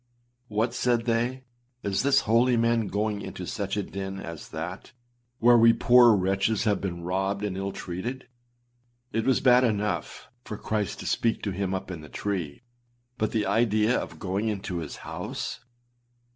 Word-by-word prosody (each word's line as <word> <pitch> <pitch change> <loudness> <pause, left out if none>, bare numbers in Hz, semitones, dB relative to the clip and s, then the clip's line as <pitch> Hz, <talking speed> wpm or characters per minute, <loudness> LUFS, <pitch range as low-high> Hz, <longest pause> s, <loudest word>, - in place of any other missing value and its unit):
âWhat!â 110 +3 0
said 120 -2 +1
they, 120 +3 0 0.4
âIs 100 -1 +1
this 140 0 +4
holy 120 +3 +3
man 115 -1 +2
going 105 +1 -1
into - - -6
such - - -3
a - - 0
den 95 0 -5
as 85 -4 -8
that, 90 +9 -6 0.4
where 120 0 +6
we 115 0 +7
poor 120 -2 +6
wretches 95 +3 +1
have 105 -2 +1
been 85 -3 -4
robbed 95 +3 -1
and 100 -3 -3
ill 95 +1 -3
treated. 110 +10 -5 0.9
It 115 - 0
was 130 - +3
bad 125 -1 +6
enough 105 -3 -1 0.2
for 105 - -6
Christ 105 -4 -2
to - - -8
speak 115 -1 0
to 100 - -1
him 95 0 -2
up 95 0 -5
in 85 -4 -6
the 75 - -12
tree, 90 - -4 0.6
but 110 - 0
the 110 -3 0
idea 110 0 +2
of - - -4
going 100 +3 -2
into 95 -4 -3
his 80 -3 -6
house! - - -5
105 Hz, 170 wpm, -27 LUFS, 95-115 Hz, 0.9 s, we